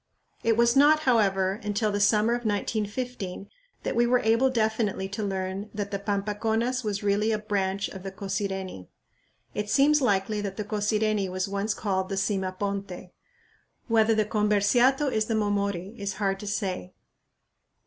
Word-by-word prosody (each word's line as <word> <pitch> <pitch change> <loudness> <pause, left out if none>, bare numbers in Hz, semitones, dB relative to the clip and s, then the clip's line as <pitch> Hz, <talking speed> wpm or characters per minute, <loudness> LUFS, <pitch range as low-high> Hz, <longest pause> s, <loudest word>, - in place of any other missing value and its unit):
It 225 -1 +2
was 235 +1 +4
not, 300 +3 +6
however, 195 -7 +2
until 210 +1 0
the 205 - -1
summer 210 +3 +3
of 240 0 -2
1915 210 -1 -3 0.4
that - - -2
we 240 0 +3
were 250 +1 +4
able 230 +4 +3
definitely 220 -5 0
to 200 +2 -4
learn 195 0 -3
that 205 -1 -3
the 200 - -2
Pampaconas 220 +5 -1
was 205 -2 -2
really 205 +2 +2
a 215 - +1
branch 200 -2 -1
of 190 - -9
the 195 +1 -6
Cosireni. 190 - -4 0.7
It 210 0 -3
seems 290 +4 +4
likely 205 -2 +1
that 195 -2 -5
the 210 - -2
Cosireni 210 -1 0
was 185 +1 -2
once 200 +1 -1
called 190 -3 -1
the 195 - -2
"Sima 190 -1 -1
ponte." 195 -2 -4 0.8
Whether 225 0 +4
the 215 -1 +2
Comberciato 215 +6 +3
is 215 -2 +1
the 225 - -1
"Momori" 200 -2 -1
is 200 -1 -3
hard 195 0 -1
to 210 - -7
say. 190 - -3
205 Hz, 160 wpm, -27 LUFS, 195-220 Hz, 0.8 s, not